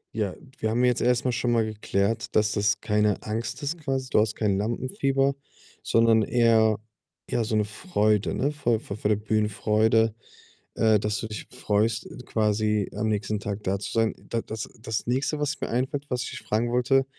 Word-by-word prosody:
Ja, 105 Hz, -4 st, -1 dB, 0.2 s
wir 110 Hz, -, 0 dB
haben 120 Hz, +3 st, +1 dB
jetzt 125 Hz, -1 st, +2 dB
erst 125 Hz, 0 st, +2 dB
mal 125 Hz, -, +2 dB
schon 120 Hz, +1 st, 0 dB
mal 115 Hz, -2 st, +3 dB
geklärt, 110 Hz, 0 st, -1 dB
dass 105 Hz, 0 st, +3 dB
das 105 Hz, +1 st, +1 dB
keine 105 Hz, -2 st, +1 dB
Angst 115 Hz, +6 st, -3 dB
ist 150 Hz, +4 st, -2 dB
quasi. 135 Hz, -3 st, -2 dB
Du -, -, +3 dB
hast 110 Hz, 0 st, +1 dB
kein 100 Hz, -3 st, +1 dB
Lampenfieber, 135 Hz, +5 st, 0 dB, 0.5 s
sondern 115 Hz, -1 st, +4 dB
eher 110 Hz, -2 st, +4 dB, 0.5 s
ja, 120 Hz, -, +1 dB
so 110 Hz, 0 st, -1 dB
'ne 105 Hz, -, +2 dB
Freude, 110 Hz, -, 0 dB
ne? 140 Hz, +3 st, 0 dB
Vor 120 Hz, -6 st, +1 dB
vor 100 Hz, -, -7 dB
der 105 Hz, -, +3 dB
Bühnenfreude, 110 Hz, +1 st, +2 dB, 0.6 s
äh, 110 Hz, -1 st, +4 dB
dass 105 Hz, 0 st, -1 dB
du -, -, -4 dB
dich 105 Hz, -1 st, -7 dB
freust, 110 Hz, +2 st, 0 dB, 0.2 s
quasi 105 Hz, -1 st, +1 dB
am 110 Hz, +2 st, -1 dB
nächsten 105 Hz, 0 st, -1 dB
Tag 100 Hz, +1 st, -4 dB
da 95 Hz, +1 st, 0 dB
zu 100 Hz, -, -6 dB
sein. 115 Hz, -1 st, +2 dB, 0.2 s
Da 115 Hz, -, 0 dB
das 110 Hz, -1 st, -6 dB
das 110 Hz, -2 st, -3 dB
Nächste, 135 Hz, +5 st, 0 dB
was 145 Hz, 0 st, -2 dB
mir -, -, -2 dB
einfällt, 130 Hz, +4 st, -1 dB
was 125 Hz, -1 st, -1 dB
ich -, -, -5 dB
dich -, -, -6 dB
fragen 120 Hz, +3 st, -1 dB
wollte: 135 Hz, +2 st, +3 dB
110 Hz, 190 wpm, -26 LUFS, 105-120 Hz, 0.6 s, sondern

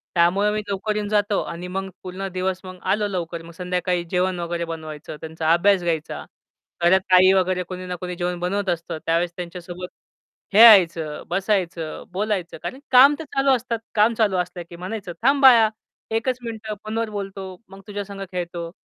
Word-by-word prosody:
त्यामुळं 185 Hz, +5 st, +3 dB
मी 215 Hz, -, -1 dB
लवकर 200 Hz, +2 st, -2 dB
येऊन 210 Hz, -1 st, -2 dB
जातो 205 Hz, -1 st, +1 dB
आणि 175 Hz, +2 st, -6 dB
मग 195 Hz, 0 st, -3 dB
पूर्ण 185 Hz, +1 st, -5 dB
दिवस 185 Hz, 0 st, -1 dB
मग 185 Hz, -1 st, -10 dB
आलो 210 Hz, 0 st, 0 dB
लवकर 170 Hz, -3 st, -4 dB
मग 170 Hz, -, -11 dB
संध्याकाळी 180 Hz, 0 st, -1 dB
जेवण 180 Hz, 0 st, 0 dB
वगैरे 170 Hz, 0 st, -3 dB
बनवायचं, 155 Hz, -2 st, -7 dB
त्यांचा 160 Hz, 0 st, 0 dB
अभ्यास 190 Hz, +2 st, +3 dB
घ्यायचा. 165 Hz, -3 st, -2 dB, 0.6 s
घरात 180 Hz, +2 st, +6 dB
ताई 185 Hz, +1 st, +7 dB
वगैरे 185 Hz, -1 st, +1 dB
कोणी 185 Hz, +1 st, -7 dB
ना 180 Hz, 0 st, -4 dB
कोणी 180 Hz, -1 st, -4 dB
जेवण 175 Hz, 0 st, -2 dB
बनवत 195 Hz, +3 st, -1 dB
असतं. 170 Hz, -2 st, -3 dB
त्यावेळेस 170 Hz, +1 st, +1 dB
त्यांच्यासोबत 180 Hz, 0 st, -7 dB, 0.7 s
खेळायचं, 175 Hz, -8 st, +6 dB
बसायचं, 180 Hz, -4 st, -1 dB
बोलायचं. 195 Hz, -3 st, -2 dB
कारण 260 Hz, -, -5 dB
काम 270 Hz, +3 st, +8 dB
तर 320 Hz, -, -6 dB
चालू 275 Hz, 0 st, +3 dB
असतात. 235 Hz, -2 st, -3 dB, 0.2 s
काम 215 Hz, +2 st, +4 dB
चालू 210 Hz, -4 st, +2 dB
असल्या, 180 Hz, 0 st, -3 dB
की 175 Hz, -, -10 dB
म्हणायचं, 185 Hz, +2 st, -6 dB
"थांब 275 Hz, +2 st, +3 dB
बाळा, 230 Hz, -5 st, +8 dB, 0.4 s
1 225 Hz, +3 st, 0 dB
च 255 Hz, -, -1 dB
मिनिटं 220 Hz, -2 st, -5 dB
फोनवर 225 Hz, +1 st, -2 dB
बोलतो, 195 Hz, -2 st, -6 dB
मग 195 Hz, 0 st, -12 dB
तुझ्यासंग 200 Hz, -1 st, -6 dB
खेळतो." 175 Hz, -2 st, -4 dB
185 Hz, 170 wpm, -23 LUFS, 175-210 Hz, 0.7 s, काम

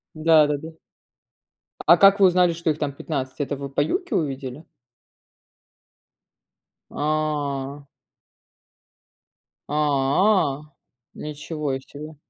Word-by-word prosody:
Да-да-да! 155 Hz, -1 st, +3 dB, 1.2 s
А 170 Hz, +2 st, +8 dB
как 200 Hz, +1 st, +6 dB
вы 195 Hz, -, +8 dB
узнали, 180 Hz, -1 st, +3 dB
что 165 Hz, -1 st, -1 dB
их 150 Hz, -, -2 dB
там 145 Hz, -2 st, -2 dB
15? 135 Hz, -2 st, -5 dB
Это 145 Hz, 0 st, -2 dB
вы 140 Hz, 0 st, -6 dB
по 140 Hz, -, -2 dB
"Юке" 365 Hz, -, -1 dB
увидели? 135 Hz, -1 st, -3 dB, 2.3 s
А! 145 Hz, -2 st, -2 dB, 1.8 s
А, 145 Hz, +2 st, +2 dB, 0.5 s
ничего 150 Hz, -2 st, -4 dB
себе. 150 Hz, +3 st, -11 dB
150 Hz, 90 wpm, -23 LUFS, 140-160 Hz, 2.3 s, А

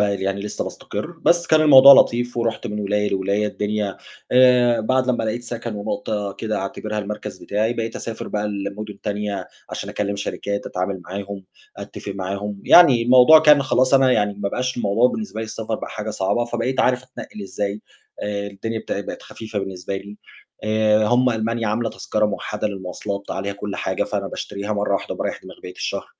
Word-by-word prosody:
يعني 100 Hz, -1 st, 0 dB
لسه 105 Hz, +1 st, -4 dB
باستقِرّ، 160 Hz, +12 st, -6 dB
بس 175 Hz, 0 st, +3 dB
كان 155 Hz, 0 st, +4 dB
الموضوع 140 Hz, -2 st, +10 dB
لطيف، 120 Hz, -1 st, +4 dB
ورُحت 115 Hz, -1 st, -1 dB
من 105 Hz, 0 st, -4 dB
ولاية 105 Hz, 0 st, 0 dB
لولاية 100 Hz, +2 st, 0 dB
الدنيا 105 Hz, -2 st, -2 dB, 0.4 s
آآ، 125 Hz, -2 st, +5 dB
بعد 130 Hz, +3 st, +1 dB
لمّا 120 Hz, -3 st, +1 dB
لقيت 120 Hz, +2 st, -2 dB
سَكَن 120 Hz, -2 st, -5 dB
ونقطة 105 Hz, 0 st, -3 dB
كده 110 Hz, +2 st, -3 dB
أعتبرها 105 Hz, +2 st, -4 dB
المركز 105 Hz, +1 st, -5 dB
بتاعي، 110 Hz, +3 st, -1 dB
بقيت 115 Hz, -1 st, -4 dB
أسافر 115 Hz, -1 st, -6 dB
بقى 105 Hz, 0 st, -2 dB
لمدن 100 Hz, 0 st, -5 dB
تانية، 100 Hz, -2 st, -3 dB, 0.2 s
عشان -, -, -5 dB
أكلم 100 Hz, -1 st, -2 dB
شركات 100 Hz, 0 st, -4 dB
أتعامل 95 Hz, +1 st, -3 dB
معاهم، 100 Hz, +1 st, -6 dB, 0.3 s
أتفق 100 Hz, -, -7 dB
معاهم، 100 Hz, +1 st, -4 dB
يعني 140 Hz, -9 st, +7 dB
الموضوع 125 Hz, +6 st, +8 dB
كان 150 Hz, -2 st, +6 dB
خلاص 130 Hz, 0 st, +2 dB
أنا 135 Hz, -1 st, +5 dB
يعني 105 Hz, -3 st, +1 dB
ما 100 Hz, 0 st, -3 dB
بقاش 125 Hz, +4 st, -2 dB
الموضوع 115 Hz, +2 st, +3 dB
بالنسبة 210 Hz, -, -5 dB
لي -, -, -2 dB
السفر 110 Hz, 0 st, -4 dB
بقى -, -, -6 dB
حاجة 110 Hz, 0 st, -5 dB
صعبة، 105 Hz, +3 st, 0 dB
فبقيت 120 Hz, +2 st, -1 dB
عارف 125 Hz, 0 st, +2 dB
أتنقِّل 130 Hz, -4 st, -10 dB
إزاي 100 Hz, +2 st, -4 dB, 0.4 s
آآ، 100 Hz, -1 st, -3 dB
الدنيا 110 Hz, +3 st, -4 dB
بتا 100 Hz, -, -4 dB
بقِت 100 Hz, -, -7 dB
خفيفة 110 Hz, -2 st, -6 dB
بالنسبة 95 Hz, 0 st, -4 dB
لي 100 Hz, +2 st, -9 dB, 0.5 s
آآ، 110 Hz, 0 st, +3 dB
هم 125 Hz, +2 st, +3 dB
ألمانيا 115 Hz, 0 st, -1 dB
عاملة 115 Hz, +2 st, -1 dB
تذكرة 105 Hz, 0 st, -1 dB
موَحَدَة 105 Hz, 0 st, -3 dB
للمواصلات 100 Hz, +1 st, -5 dB
عليها 100 Hz, +1 st, -3 dB
كُلّ 100 Hz, 0 st, -6 dB
حاجة، -, -, -1 dB
فأنا -, -, -3 dB
باشتريها 100 Hz, +1 st, -5 dB
مرّه 105 Hz, -1 st, -1 dB
واحدة -, -, -3 dB
وباريّح -, -, -4 dB
دماغي -, -, -13 dB
بقيّة 90 Hz, -, -8 dB
الشهر. -, -, -4 dB
105 Hz, 180 wpm, -21 LUFS, 100-120 Hz, 0.5 s, الموضوع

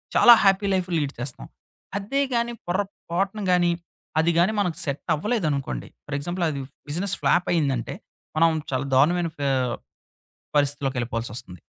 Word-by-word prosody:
చాలా 240 Hz, -, +9 dB
happy 195 Hz, 0 st, +4 dB
life 185 Hz, -1 st, 0 dB
lead 145 Hz, -3 st, -1 dB
చేస్తాం. 125 Hz, 0 st, -5 dB, 0.5 s
అదే 210 Hz, +8 st, -1 dB
గాని 235 Hz, 0 st, 0 dB
పొరపాటున 195 Hz, +1 st, -2 dB
గాని, 175 Hz, -1 st, +4 dB, 0.5 s
అది 170 Hz, +1 st, +3 dB
గాని 180 Hz, +5 st, +4 dB
మనకు 180 Hz, -5 st, 0 dB
సెట్టవ్వలేదనుకోండి, 150 Hz, -, -1 dB, 0.2 s
ఫర్ 145 Hz, -, -4 dB
ఎగ్జాంపుల్ 175 Hz, +4 st, -2 dB
అది 140 Hz, -2 st, -3 dB, 0.3 s
బిజినెస్ 185 Hz, +6 st, -1 dB
ఫ్లాప్ 175 Hz, +1 st, +3 dB
అయిందంటే 140 Hz, -8 st, 0 dB, 0.4 s
మనం 165 Hz, +1 st, +6 dB, 0.2 s
చాలా 130 Hz, +1 st, -1 dB
దారుణమైన 170 Hz, +5 st, +3 dB
ఫే 140 Hz, -1 st, -1 dB, 1.1 s
పరిస్థితిలోకెళ్ళిపోవాల్సొస్తుంది. 120 Hz, -, -1 dB
165 Hz, 125 wpm, -24 LUFS, 140-190 Hz, 1.1 s, చాలా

